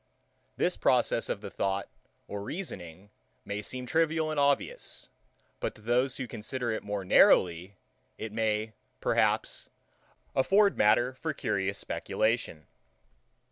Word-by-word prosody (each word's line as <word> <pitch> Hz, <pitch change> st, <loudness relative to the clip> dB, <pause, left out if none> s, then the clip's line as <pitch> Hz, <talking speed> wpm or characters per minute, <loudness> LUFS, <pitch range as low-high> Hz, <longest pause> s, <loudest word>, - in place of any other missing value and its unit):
This -, -, +1 dB
process -, -, +2 dB
of -, -, -2 dB
the -, -, -7 dB
thought 100 Hz, 0 st, -1 dB, 0.4 s
or 100 Hz, 0 st, -5 dB
reasoning 100 Hz, -, -6 dB, 0.3 s
may 100 Hz, +1 st, -3 dB
seem 125 Hz, +4 st, -3 dB
trivial 160 Hz, +2 st, +1 dB
and 155 Hz, -, -1 dB
obvious; 140 Hz, 0 st, 0 dB, 0.5 s
but -, -, -3 dB
to -, -, -16 dB
those 125 Hz, +4 st, +1 dB
who 130 Hz, -, -3 dB
consider 120 Hz, +2 st, -3 dB
it 110 Hz, -, -2 dB
more 100 Hz, -2 st, -4 dB
narrowly, 90 Hz, +1 st, +4 dB, 0.4 s
it 110 Hz, -, -5 dB
may, 110 Hz, 0 st, 0 dB, 0.3 s
perhaps, -, -, +1 dB, 0.6 s
afford 200 Hz, +9 st, +4 dB
matter 120 Hz, +4 st, +3 dB
for 155 Hz, +3 st, -4 dB
curious 100 Hz, -5 st, -1 dB
speculation. 110 Hz, -11 st, -1 dB
110 Hz, 125 wpm, -29 LUFS, 100-130 Hz, 0.6 s, narrowly